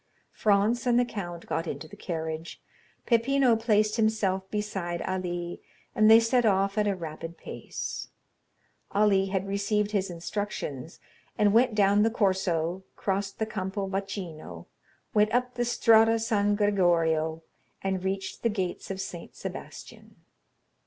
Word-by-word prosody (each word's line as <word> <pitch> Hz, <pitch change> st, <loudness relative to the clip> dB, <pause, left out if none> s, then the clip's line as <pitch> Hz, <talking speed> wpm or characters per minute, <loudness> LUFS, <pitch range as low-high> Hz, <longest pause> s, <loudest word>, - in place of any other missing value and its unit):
Franz 215 Hz, +4 st, +2 dB
and 240 Hz, 0 st, +4 dB
the 245 Hz, -, +3 dB
count 175 Hz, -7 st, -6 dB
got 165 Hz, +1 st, -2 dB
into 160 Hz, -, -5 dB
the -, -, -12 dB
carriage. 160 Hz, -1 st, -5 dB, 0.5 s
Peppino 245 Hz, +1 st, +3 dB
placed 215 Hz, -1 st, +2 dB
himself 200 Hz, -4 st, +1 dB
beside 190 Hz, -5 st, -3 dB
Ali, 175 Hz, -2 st, -3 dB, 0.3 s
and 215 Hz, 0 st, +5 dB
they 225 Hz, +1 st, +9 dB
set 240 Hz, +2 st, +2 dB
off 195 Hz, -2 st, +2 dB
at 210 Hz, -, +2 dB
a 200 Hz, -, +1 dB
rapid 165 Hz, -1 st, -7 dB
pace. -, -, -6 dB, 0.9 s
Ali 200 Hz, -2 st, +3 dB
had 190 Hz, 0 st, -2 dB
received 205 Hz, +1 st, 0 dB
his 195 Hz, -2 st, 0 dB
instructions, 170 Hz, -5 st, -5 dB, 0.4 s
and 205 Hz, -1 st, +3 dB
went 235 Hz, 0 st, +4 dB
down 200 Hz, 0 st, +4 dB
the 225 Hz, -, +4 dB
Corso, 185 Hz, -5 st, 0 dB
crossed 195 Hz, 0 st, -2 dB
the 220 Hz, -, 0 dB
Campo 195 Hz, -2 st, -3 dB
Vaccino, 185 Hz, -, -5 dB, 0.5 s
went 210 Hz, 0 st, +3 dB
up 250 Hz, 0 st, 0 dB
the 240 Hz, -, -1 dB
Strada 225 Hz, -1 st, +5 dB
San 205 Hz, -2 st, +1 dB
Gregorio, 165 Hz, -6 st, +2 dB, 0.4 s
and 190 Hz, -1 st, -1 dB
reached 195 Hz, 0 st, -3 dB
the 230 Hz, -, +2 dB
gates 190 Hz, -4 st, -3 dB
of 190 Hz, -1 st, -4 dB
St. 175 Hz, -3 st, -7 dB
Sebastian. -, -, -9 dB
200 Hz, 140 wpm, -28 LUFS, 175-215 Hz, 0.9 s, they